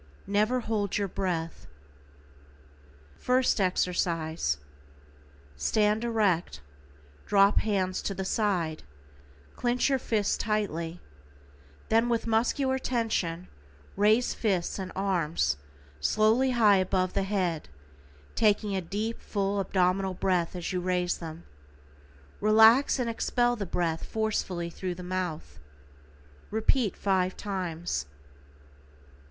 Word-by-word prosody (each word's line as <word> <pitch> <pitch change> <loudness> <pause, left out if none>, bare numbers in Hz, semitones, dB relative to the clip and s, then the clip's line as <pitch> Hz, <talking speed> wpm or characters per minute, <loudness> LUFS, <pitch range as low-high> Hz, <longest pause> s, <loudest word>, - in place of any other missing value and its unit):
NEVER 215 +5 +1
HOLD 210 -3 -1
YOUR 200 -1 0
BREATH. 175 -3 -3 1.5
=FIRST 250 -4 +2
EXERCISE:= 170 - 0 1.0
Stand 210 - +1
erect, 205 - 0 0.7
drop 200 0 +5
hands 190 -4 -1
to 195 - -3
the 190 - -4
side, 185 -7 0 0.7
clinch 245 +2 +1
your 270 -1 +2
fists 215 -4 0
tightly, 175 -6 -2 0.9
then 230 +2 +3
with 235 -1 0
muscular 255 +4 +1
tension 205 -9 -1 0.5
raise 215 +5 +3
fists 195 -4 -1
and 185 -1 -5
arms 170 - 0 0.4
slowly 220 - +3
high 220 -5 +5
above 185 0 0
the - - +1
head, 185 -5 -1 0.6
taking 210 -2 +2
a 190 - 0
deep, 210 +6 -4
full, 200 -1 -1
abdominal 190 0 +1
breath 180 -2 0
as 180 +1 -4
you 180 - -1
raise 180 -1 0
them, 165 0 -8 1.0
relax 220 +7 +6
and 250 -2 -1
expel 240 +1 +1
the 200 -4 -5
breath 165 -2 -1
forcefully 190 -6 -2
through 180 +1 -4
the 180 - -8
mouth. 175 - -4 0.9
Repeat 220 0 +1
5 185 -2 0
times. 175 - -3
195 Hz, 105 wpm, -28 LUFS, 180-220 Hz, 1.5 s, relax